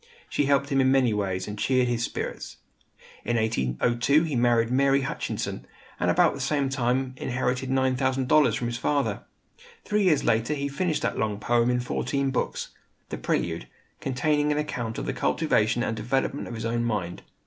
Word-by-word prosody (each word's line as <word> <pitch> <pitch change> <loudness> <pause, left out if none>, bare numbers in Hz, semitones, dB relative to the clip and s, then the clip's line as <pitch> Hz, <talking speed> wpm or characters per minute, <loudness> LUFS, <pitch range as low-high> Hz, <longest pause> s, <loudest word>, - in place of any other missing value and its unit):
She 145 - +1
helped 140 0 +2
him 135 -1 +3
in 130 0 +3
many 130 -4 +3
ways, 95 -3 -2
and 105 0 -6
cheered 130 +1 +2
his 120 -1 -1
spirits. - - -5 0.7
In 120 - -1
1802 115 - +1
he 155 -4 -2
married 120 -1 +2
Mary 135 +1 +3
Hutchinson, 135 - -4 0.3
and - - +1
about - - +4
the 140 - -7
same 140 0 0
time 130 0 0
inherited 130 +1 -2
$9,000 130 -1 +2
from 120 - -3
his 120 0 -3
father. 145 +1 0 0.6
Three 210 0 +1
years 155 -6 +3
later 115 +7 +1
he 140 0 -2
finished 155 +3 -1
that - - -1
long 105 -2 -1
poem 120 +2 +2
in 125 0 +1
fourteen 135 +2 -1
books, 130 - -2 0.4
"The - - -5
Prelude," 85 -1 -1 0.3
containing 150 +3 +1
an 150 - 0
account 120 -7 -3
of - - -3
the - - -2
cultivation 120 -7 +1
and 115 - -1
development 135 +5 -1
of 120 - -6
his 110 0 -5
own 120 +1 0
mind. 100 -7 -2
125 Hz, 175 wpm, -26 LUFS, 115-140 Hz, 0.7 s, about